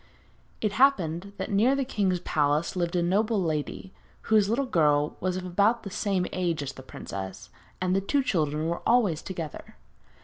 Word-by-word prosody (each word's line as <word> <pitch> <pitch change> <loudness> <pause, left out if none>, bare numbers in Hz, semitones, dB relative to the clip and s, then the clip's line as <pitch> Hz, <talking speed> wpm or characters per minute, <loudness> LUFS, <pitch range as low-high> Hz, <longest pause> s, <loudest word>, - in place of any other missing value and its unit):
It 215 - +1
happened 200 - +2
that 190 +1 -4
near 225 +7 +4
the 275 -1 0
king's 195 -7 0
palace 150 0 +1
lived 175 -1 -1
a 175 - +2
noble 210 +5 +2
lady, 160 +2 -3 0.3
whose 215 -2 +3
little 260 +5 +1
girl 150 - +2
was 185 0 -1
of 185 - -5
about 205 +6 +2
the 200 - -7
same 195 -3 0
age 170 -5 -1
as 135 -1 -5
the - - -11
princess, 95 -5 -8 0.3
and 185 0 +1
the 195 - +2
two 275 +8 +1
children 155 - 0
were 170 +1 -2
always 205 -10 +3
together. 165 -5 -7
185 Hz, 175 wpm, -27 LUFS, 160-210 Hz, 0.3 s, near